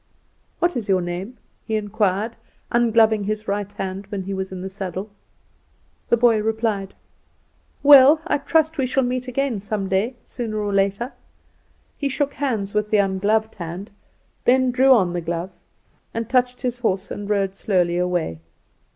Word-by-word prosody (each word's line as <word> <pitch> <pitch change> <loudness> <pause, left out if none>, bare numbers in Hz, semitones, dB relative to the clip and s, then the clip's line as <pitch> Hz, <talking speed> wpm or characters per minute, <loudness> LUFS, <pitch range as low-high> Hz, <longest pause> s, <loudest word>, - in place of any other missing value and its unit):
"What 345 0 +1
is 225 -4 -3
your 190 -1 +4
name?" 180 +8 -5 0.3
he 220 - -2
inquired, 210 +1 0 0.4
ungloving 225 -3 +3
his 215 +1 -3
right 205 0 -2
hand 195 0 -5
when 200 -2 -4
he 195 +1 -4
was 190 0 -4
in 185 -1 -6
the - - -4
saddle. 190 +1 -5 1.0
The 235 - +4
boy 230 -2 +4
replied: 220 -3 -1 0.9
"Well, 285 +1 +8
I 320 - +1
trust 315 +1 +1
we 260 - +2
shall 265 +1 +1
meet 250 +1 -2
again 255 -3 -1
some 200 0 -3
day, 200 +7 0
sooner 225 -3 -5
or 205 -1 -2
later." 200 +6 0 0.9
He 280 - 0
shook 280 +1 -1
hands 225 -9 -2
with 210 0 0
the 215 - +3
ungloved 205 +3 +1
hand; 180 +3 -7 0.5
then 255 0 +4
drew 260 +2 +4
on 190 -9 +4
the 175 - -2
glove, 170 +2 -4 0.6
and 230 -1 -2
touched 250 0 +1
his 245 -1 -2
horse, 195 -4 -1
and 205 0 -5
rode 195 -2 0
slowly 180 -4 +1
away. 175 - -1
210 Hz, 160 wpm, -22 LUFS, 195-245 Hz, 1.0 s, Well